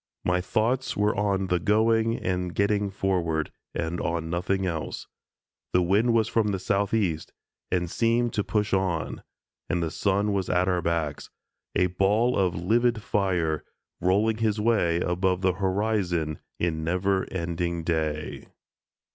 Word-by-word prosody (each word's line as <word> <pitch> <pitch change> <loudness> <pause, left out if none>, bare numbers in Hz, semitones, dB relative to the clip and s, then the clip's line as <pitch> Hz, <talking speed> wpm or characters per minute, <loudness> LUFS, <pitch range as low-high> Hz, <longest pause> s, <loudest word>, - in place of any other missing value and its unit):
My 90 0 +2
thoughts 120 +6 0
were 105 +1 +2
on 100 -2 +1
the 90 -1 +1
going 110 +3 +2
and 90 -1 -2
getting 100 0 +1
forward, 85 -5 -1 0.2
and 85 +1 -2
on 80 0 -2
nothing 95 +2 0
else. 80 -4 -3 0.7
The 90 - +4
wind 105 +7 +3
was 110 -2 +3
from 110 -1 +1
the 100 -2 0
southeast, 100 -3 0 0.4
and 90 -1 0
seemed 115 +5 +1
to 105 -3 0
push 105 0 -1
on, 90 -5 0 0.5
and 85 -1 0
the 80 - -2
sun 100 +2 +1
was 95 -2 -1
at 90 +1 +2
our 90 -2 +1
backs, 80 -3 -2 0.5
a 90 - +4
ball 100 +7 +2
of 90 -3 +1
livid 115 +5 +1
fire, 90 -7 0 0.4
rolling 105 +5 +2
his 110 -2 0
way 100 -7 +2
above 90 +1 0
the 95 -1 +2
horizon 95 -5 0 0.2
in 80 -2 -1
never 95 +3 0
ending 85 -1 -2
day. 80 -2 -2
95 Hz, 145 wpm, -26 LUFS, 85-105 Hz, 0.7 s, The